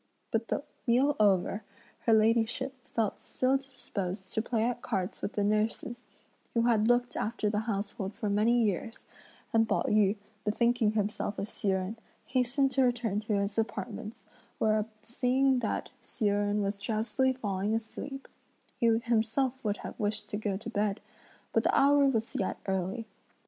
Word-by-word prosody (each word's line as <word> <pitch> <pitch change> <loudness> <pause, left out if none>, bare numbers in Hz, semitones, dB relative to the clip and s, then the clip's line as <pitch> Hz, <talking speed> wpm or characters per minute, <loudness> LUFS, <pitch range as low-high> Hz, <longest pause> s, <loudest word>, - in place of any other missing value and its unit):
But 230 0 0
the - - -1 0.2
meal 265 +5 +4
over, 200 0 +3 0.5
her 225 - +6
ladyship 230 +4 +3
felt 220 -3 -2
still 260 +1 +1
disposed 205 -8 -5
to 220 - +2
play 225 -1 0
at 245 +1 -1
cards 190 -4 -2
with 200 - -3
the 205 - 0
nurses, 220 +4 0 0.5
who 230 - +3
had 225 -2 +3
looked 245 0 +2
after 215 -1 -1
the 210 - +1
household 200 0 -3
for 215 0 -3
many 225 +4 +3
years; 215 +2 -2 0.5
and 225 -1 +4
Pao - - +2
yü, 210 -1 +3 0.3
bethinking 225 0 +2
himself 210 -1 -1
of 200 - -2
Hsi 210 - -4
Jen, 190 +3 0 0.3
hastened 260 +1 +1
to 265 +1 +2
return 240 -5 +1
to 215 0 -2
his 200 +2 0
apartments; 225 -1 -4 0.3
where 215 0 +2 0.2
seeing 255 +3 +2
that 225 - -2
Hsi 230 - -4
Jen 205 0 +2
was 200 0 -2
drowsily 235 +5 +1
falling 205 -3 -1
asleep, 270 +5 -5 0.5
he 235 - +3
himself 230 +3 +2
would 210 -2 0
have - - -7
wished 210 0 -1
to 205 - -1
go 205 -2 -1
to 220 +3 -7
bed, 205 -1 0 0.5
but 225 - +4
the - - +2
hour 280 0 +5
was 225 -4 0
yet 195 - -1
early. 190 +4 -1
220 Hz, 160 wpm, -30 LUFS, 205-240 Hz, 0.5 s, her